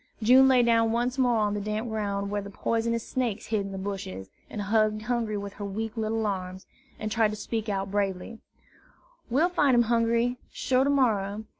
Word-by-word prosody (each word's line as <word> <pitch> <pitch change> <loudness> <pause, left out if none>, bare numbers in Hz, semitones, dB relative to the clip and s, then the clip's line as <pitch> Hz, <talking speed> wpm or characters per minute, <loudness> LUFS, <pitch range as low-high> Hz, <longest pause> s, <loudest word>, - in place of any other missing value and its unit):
June 260 +4 +7
lay 255 -2 +5
down 230 -1 +3
once 245 +3 -1
more 245 -2 +3
on 210 -1 +1
the 205 - -2
damp 215 +3 -3
ground 200 -2 -2
where 205 0 -1
the 200 - -8
poisonous 230 +2 -1
snakes 230 -5 -2
hid 215 -2 0
in 195 0 -6
the 195 - -5
bushes, 190 - -6 0.2
and 215 - -6
hugged 215 +1 +1
Hungry 230 -3 -1
with 200 0 -6
her 205 - -8
weak 220 +3 -4
little 220 0 -1
arms, 185 -1 -4 0.3
and 215 0 -4
tried 225 -1 +3
to 210 - -4
speak 220 0 -3
out 195 -1 -2
bravely: 200 +2 -2 0.9
"We'll 295 +9 +3
fine 290 -7 +3
him, 240 - +5
Hungry, 235 +1 +1
sure, 260 0 +1
to - - +1
morrer. 215 -7 +1
220 Hz, 195 wpm, -27 LUFS, 200-235 Hz, 0.9 s, June